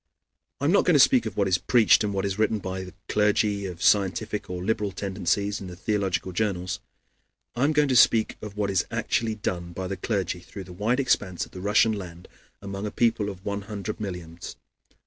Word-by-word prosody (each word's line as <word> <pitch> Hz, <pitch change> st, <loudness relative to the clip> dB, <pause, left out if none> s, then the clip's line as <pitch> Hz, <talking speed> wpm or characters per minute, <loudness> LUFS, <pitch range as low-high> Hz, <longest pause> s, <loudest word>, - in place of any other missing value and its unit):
I 140 Hz, -, -2 dB
am 155 Hz, -, +4 dB
not 200 Hz, -, +5 dB
going 180 Hz, -, +4 dB
to -, -, +6 dB
speak 125 Hz, -3 st, +5 dB
of 105 Hz, -, -7 dB
what 100 Hz, -1 st, +2 dB
is 90 Hz, -2 st, +2 dB
preached 115 Hz, +1 st, +4 dB
and 105 Hz, -, -1 dB
what 100 Hz, 0 st, -1 dB
is 100 Hz, +1 st, -2 dB
written 110 Hz, 0 st, +2 dB
by 95 Hz, -1 st, -5 dB, 0.2 s
clergy 105 Hz, -1 st, +1 dB
of 90 Hz, -1 st, -7 dB
scientific 100 Hz, +1 st, +1 dB
or 90 Hz, 0 st, -4 dB
liberal 105 Hz, -1 st, 0 dB
tendencies 100 Hz, +2 st, -1 dB
in 95 Hz, -, -7 dB
the 90 Hz, -, -8 dB
theological 95 Hz, -1 st, -1 dB
journals. 95 Hz, -2 st, -2 dB, 0.8 s
I 125 Hz, -, +2 dB
am 150 Hz, -, +3 dB
going 150 Hz, -1 st, +3 dB
to 130 Hz, -, +1 dB
speak 115 Hz, -2 st, +5 dB
of 105 Hz, -1 st, -8 dB
what 100 Hz, -1 st, 0 dB
is 95 Hz, -, +2 dB
actually 110 Hz, -2 st, -1 dB
done 85 Hz, -4 st, -4 dB
by 95 Hz, +2 st, -4 dB
the 100 Hz, 0 st, -4 dB
clergy 95 Hz, -2 st, -2 dB
through 95 Hz, +3 st, -9 dB
the 90 Hz, -1 st, -11 dB
wide 110 Hz, +8 st, 0 dB
expanse 100 Hz, -9 st, 0 dB
of -, -, -20 dB
the 90 Hz, -, -8 dB
Russian 105 Hz, +3 st, +3 dB
land 90 Hz, -4 st, -8 dB, 0.4 s
among 100 Hz, +1 st, -4 dB
a -, -, -2 dB
people 115 Hz, -3 st, +1 dB
of 95 Hz, -1 st, -10 dB
one 100 Hz, 0 st, -2 dB
hundred 105 Hz, +1 st, -6 dB
millions. 90 Hz, -5 st, -7 dB
100 Hz, 210 wpm, -26 LUFS, 95-110 Hz, 0.8 s, to